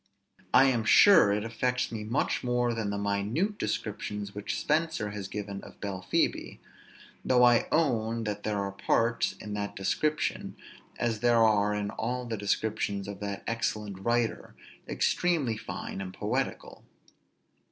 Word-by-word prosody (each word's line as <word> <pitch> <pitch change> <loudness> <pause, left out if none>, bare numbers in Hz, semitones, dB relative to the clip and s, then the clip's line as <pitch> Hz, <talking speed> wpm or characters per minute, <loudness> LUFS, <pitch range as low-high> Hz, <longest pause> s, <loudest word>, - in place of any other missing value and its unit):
I 130 - +7
am 125 -4 +2
sure 165 - +7
it 105 +1 0
affects 125 +2 -1
me 110 -2 -4
much 115 +6 -1
more 125 -1 +1
than 110 -3 -2
the 100 - -2
minute 105 - -1
description 105 -1 -3
which 105 0 -3
Spenser 155 -8 0
has 100 -2 -5
given 100 -1 -5
of - - -13
Belphebe; 95 -3 -1 0.7
though 125 -1 +4
I 120 -1 +5
own 115 -7 +1
that 105 -1 -3
there 105 -1 -2
are 100 -1 -2
parts, 115 +4 +1
in 105 - -8
that 100 0 -4
description, 150 +10 -1 0.4
as 115 -2 -1
there 120 0 +4
are 105 -1 +3
in 105 -1 -2
all 125 +2 -3
the 115 -2 -3
descriptions 100 -1 -1
of 100 -1 -7
that 100 -1 -5
excellent 105 -4 -2
writer, 120 +2 -1 0.3
extremely 160 -10 +1
fine 95 - -6
and 95 -1 -5
poetical. - - -3
110 Hz, 145 wpm, -29 LUFS, 100-120 Hz, 0.7 s, I